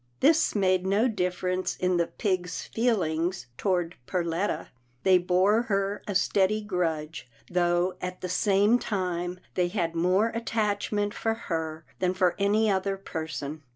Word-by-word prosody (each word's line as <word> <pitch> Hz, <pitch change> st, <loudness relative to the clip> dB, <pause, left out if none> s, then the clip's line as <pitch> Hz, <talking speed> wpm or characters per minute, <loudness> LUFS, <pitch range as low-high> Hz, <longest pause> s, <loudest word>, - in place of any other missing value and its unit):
This 310 Hz, -1 st, +4 dB
made 185 Hz, -2 st, +2 dB
no 205 Hz, +6 st, +3 dB
difference 185 Hz, -3 st, -1 dB
in 180 Hz, -1 st, +1 dB
the 170 Hz, -1 st, +1 dB
pigs' 180 Hz, -4 st, -2 dB
feelings 175 Hz, -, 0 dB
toward 175 Hz, 0 st, 0 dB
Perletta. 175 Hz, +2 st, -1 dB, 0.3 s
They 185 Hz, -1 st, +6 dB
bore 185 Hz, +5 st, +3 dB
her 200 Hz, -3 st, -1 dB
a 205 Hz, -, -3 dB
steady 200 Hz, +3 st, +2 dB
grudge, 165 Hz, -8 st, -2 dB, 0.2 s
though, 175 Hz, +1 st, +2 dB
at 180 Hz, 0 st, -5 dB
the 185 Hz, -, -3 dB
same 205 Hz, +5 st, +3 dB
time, 180 Hz, -4 st, -2 dB
they 180 Hz, -1 st, +1 dB
had 175 Hz, -3 st, -1 dB
more 185 Hz, +6 st, +2 dB
attach 220 Hz, -3 st, -1 dB
ment 205 Hz, -1 st, 0 dB
for 225 Hz, 0 st, -1 dB
her 160 Hz, -6 st, -4 dB
than 185 Hz, 0 st, +1 dB
for 185 Hz, -2 st, +3 dB
any 210 Hz, +2 st, +3 dB
other 195 Hz, -1 st, 0 dB
person. 160 Hz, -5 st, -5 dB
185 Hz, 145 wpm, -27 LUFS, 175-205 Hz, 0.3 s, They